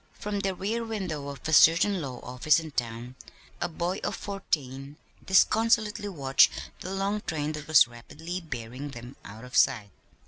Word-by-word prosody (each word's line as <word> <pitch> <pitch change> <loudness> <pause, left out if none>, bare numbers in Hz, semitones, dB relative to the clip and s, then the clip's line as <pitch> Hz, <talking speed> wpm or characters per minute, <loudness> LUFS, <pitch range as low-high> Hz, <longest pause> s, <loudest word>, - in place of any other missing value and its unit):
From 205 -1 -4
the 195 -1 -1
rear 220 +5 -2
window 185 -10 -4
of 140 +1 -7
a 160 - -1
certain 170 +5 +5
law 130 -4 -6
office 145 +6 +2
in 160 -1 -8
town 120 -1 -4 0.5
a 175 - 0
boy 175 +3 -2
of - - -2
fourteen 145 -8 -4 0.3
disconsolately 210 +1 +3
watched 135 -7 +4 0.3
the 185 - -6
long 195 +2 -1
train 150 -4 -3
that 150 -1 -7
was 155 -6 +7
rapidly 160 +10 -7
bearing 130 -2 -7
them 120 0 -10
out 110 +4 -10
of 125 - -10
sight. 105 -3 +3
155 Hz, 165 wpm, -27 LUFS, 130-195 Hz, 0.5 s, was